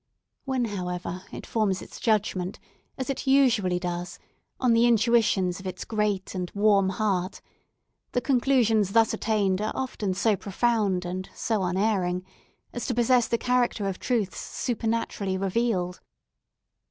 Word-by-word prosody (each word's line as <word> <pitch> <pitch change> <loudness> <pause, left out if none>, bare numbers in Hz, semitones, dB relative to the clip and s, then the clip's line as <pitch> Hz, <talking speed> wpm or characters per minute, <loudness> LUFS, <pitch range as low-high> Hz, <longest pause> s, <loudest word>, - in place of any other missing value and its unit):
When, 260 -3 0
however, 180 -2 -4
it - - -8
forms 205 -4 0
its - - -10
judgment, 205 -4 0 0.4
as 260 +1 -2
it 270 - -5
usually 245 -10 +4
does, 175 0 -4 0.4
on 250 -3 +3
the 230 +1 +5
intuitions 220 -6 +3
of 190 - -7
its 185 - -5
great 210 -3 -1
and 180 -2 -3
warm 200 -2 +4
heart, 190 -1 -1 0.7
the - - +2
conclusions 235 -6 +2
thus 225 -1 +4
attained 205 -3 +1
are 215 - -1
often 210 -7 -2
so 210 +2 +2
profound 200 -2 0
and 185 +2 -4
so 220 -3 -1
unerring 185 -1 0 0.5
as 240 - -4
to 245 - -1
possess 240 0 +3
the 235 - +1
character 245 -4 +1
of 190 -1 -3
truth 225 -7 -1
supernaturally 225 -5 -2
revealed. 190 -2 -1
210 Hz, 140 wpm, -26 LUFS, 185-235 Hz, 0.7 s, the